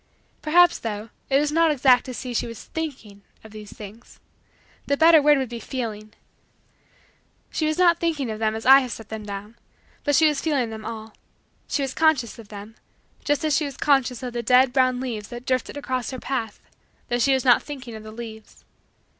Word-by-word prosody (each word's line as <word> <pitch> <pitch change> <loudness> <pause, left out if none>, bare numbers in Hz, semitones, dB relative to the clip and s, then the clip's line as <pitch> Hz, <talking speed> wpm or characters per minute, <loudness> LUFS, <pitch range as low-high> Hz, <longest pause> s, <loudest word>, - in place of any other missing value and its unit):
Perhaps, 345 +3 +4
though, 215 0 -5 0.2
it 275 0 +4
is 295 0 0
not 330 +1 +3
exact 260 -4 +4
to 255 - -6
say 250 0 -6
that 240 - -1
she - - -2
was 230 -1 -9
thinking 260 -11 -6 0.2
of 220 - -13
these 210 -1 -10
things. 215 +3 -12 0.7
The 280 - +1
better 320 0 +7
word 295 0 +5
would 265 -1 -1
be 235 -1 -6
feeling. 215 -4 -6 1.4
She 310 - -1
was 310 - -1
not 345 -2 +4
thinking 300 -8 -1
of 215 - -6
them 220 -1 0
as 225 - -6
I 270 +2 +9
have 255 -3 -4
set 225 -2 -8
them 215 -1 -7
down: 205 +3 -8 0.4
but 290 -1 +2
she 320 - +5
was 300 -2 0
feeling 275 -8 0
them 220 -1 -8
all. 220 -1 -7 0.5
She 285 - -1
was 270 -1 -3
conscious 305 -8 +1
of 225 - -12
them, 210 +2 -11 0.5
just 290 +2 0
as 305 -2 +2
she 305 - +1
was 280 -2 -7
conscious 270 -3 +1
of 250 -1 -5
the 240 - -2
dead 250 +2 +4
brown 255 -2 +2
leaves 230 -5 -5
that 240 0 -9
drifted 255 +2 -1
across 255 -3 -3
her 260 - -6
path, 235 -6 -4 0.5
though 240 - 0
she 270 +3 +3
was 265 - -2
not 245 -2 +5
thinking 270 -5 -8
of 220 - -8
the 215 0 -10
leaves. 220 -1 -11
250 Hz, 210 wpm, -23 LUFS, 220-285 Hz, 1.4 s, I